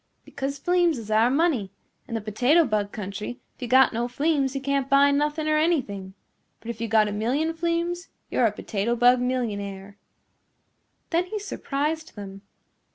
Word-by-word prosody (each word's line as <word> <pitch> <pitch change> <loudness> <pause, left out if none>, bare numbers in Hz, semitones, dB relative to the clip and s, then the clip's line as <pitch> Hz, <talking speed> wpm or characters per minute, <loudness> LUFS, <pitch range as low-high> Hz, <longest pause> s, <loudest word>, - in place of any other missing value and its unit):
"Because 275 +1 -4
fleems 350 -4 +2
is 220 -2 -7
our 220 +3 +4
money. 270 - +1 0.4
In 230 - -4
the 225 - -2
Potato 250 +11 +3
Bug 210 -4 -1
Country, 210 +4 -6 0.2
if - - -28
you 245 - -3
got 260 +1 +5
no 235 +2 -1
fleems 275 +1 0
you - - 0
can't 275 0 -1
buy 280 +1 +5
nothing 295 +2 0
nor 310 0 +2
anything. 205 - -1 0.4
But 235 - -5
if 225 -1 -10
you 230 - -1
got 220 -1 +4
a - - -3
million 255 +10 0
fleems 340 +2 -2 0.2
you're 240 - +3
a - - -1
Potato 210 +2 -2
Bug 245 +1 +5
millionaire." 205 -6 -3 1.1
Then 345 +1 +2
he 425 - -4
surprised 315 -5 -3
them. 195 -1 -8
255 Hz, 170 wpm, -25 LUFS, 215-310 Hz, 1.1 s, got